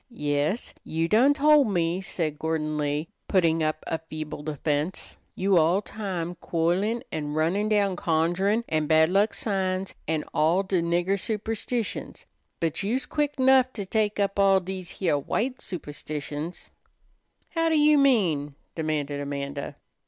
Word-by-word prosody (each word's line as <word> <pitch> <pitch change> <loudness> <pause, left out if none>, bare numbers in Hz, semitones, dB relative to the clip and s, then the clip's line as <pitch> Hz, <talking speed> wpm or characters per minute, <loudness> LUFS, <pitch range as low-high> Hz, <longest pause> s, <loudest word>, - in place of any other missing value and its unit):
"Yes, 150 - -1
you 165 +1 -1
done 250 +9 +4
tol' 300 0 +6
me," 180 -5 0
said 155 -5 -3
Gordon 155 -1 -1
Lee, 150 +1 -1 0.2
putting 165 -4 +2
up 155 0 -1
a 165 - -2
feeble 155 -2 -7
defense. 150 +3 -2 0.2
"You 195 -1 +2
all 175 +6 +3
time 185 -6 -4
quoilin' 180 +8 0
an' 150 -1 -3
runnin' 180 +7 +1
down 200 -3 +2
conjurin' 175 +7 +1
an' 155 -1 0
bad 160 +1 +5
luck 200 +4 +2
signs 190 -2 -1
an' 155 -1 0
all 170 +5 +3
de 190 -2 0
nigger 175 +4 +1
superstitions; 220 +2 -3 0.3
but 165 +1 -1
you's 230 +7 -1
quick 295 -1 -1
'nough 260 -1 +5
to 205 -4 -5
tek 210 +1 0
up 200 0 0
all 195 -1 +5
dese 185 -1 -5
heah 165 -6 +1
white 250 - -2
superstitions." 150 -1 -6 0.8
"How 330 -1 0
you 300 -2 +5
mean?" 175 - +2 0.2
demanded 150 -3 -2
Amanda. 140 0 -4
175 Hz, 140 wpm, -26 LUFS, 155-210 Hz, 0.8 s, tol